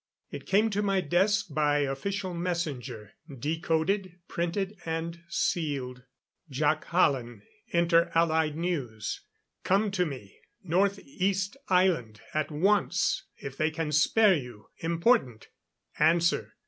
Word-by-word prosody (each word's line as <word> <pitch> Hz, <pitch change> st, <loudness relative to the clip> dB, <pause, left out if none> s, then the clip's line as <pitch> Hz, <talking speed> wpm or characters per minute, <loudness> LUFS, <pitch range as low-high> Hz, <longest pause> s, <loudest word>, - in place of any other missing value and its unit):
It -, -, -8 dB
came 215 Hz, +3 st, +3 dB
to 205 Hz, +1 st, 0 dB
my 195 Hz, -2 st, +1 dB
desk 195 Hz, +4 st, +2 dB
by 145 Hz, -1 st, +2 dB
official 185 Hz, +8 st, -2 dB
messenger, 145 Hz, -, -4 dB, 0.2 s
decoded, 165 Hz, -, -1 dB
printed 190 Hz, +4 st, -2 dB
and 165 Hz, +1 st, -4 dB
sealed. 135 Hz, -7 st, -2 dB, 0.4 s
Jac 150 Hz, +4 st, 0 dB
Hallen, 125 Hz, -, +1 dB, 0.2 s
Inter 170 Hz, 0 st, +3 dB
Allied 160 Hz, -2 st, +2 dB
News. 135 Hz, -, -3 dB, 0.4 s
Come 200 Hz, +2 st, +2 dB
to 180 Hz, -3 st, +1 dB
me, 130 Hz, -9 st, -9 dB, 0.2 s
North 190 Hz, +3 st, +2 dB
east 195 Hz, -, -1 dB
Island 175 Hz, -, +2 dB
at 155 Hz, -1 st, 0 dB
once, 180 Hz, +3 st, +1 dB
if 135 Hz, -1 st, -8 dB
they 155 Hz, -, +2 dB
can 155 Hz, -1 st, -3 dB
spare 195 Hz, +8 st, +5 dB
you. 125 Hz, -7 st, -8 dB
Important. 165 Hz, -, +1 dB, 0.5 s
Answer. 170 Hz, +3 st, +2 dB
165 Hz, 115 wpm, -28 LUFS, 145-185 Hz, 0.5 s, spare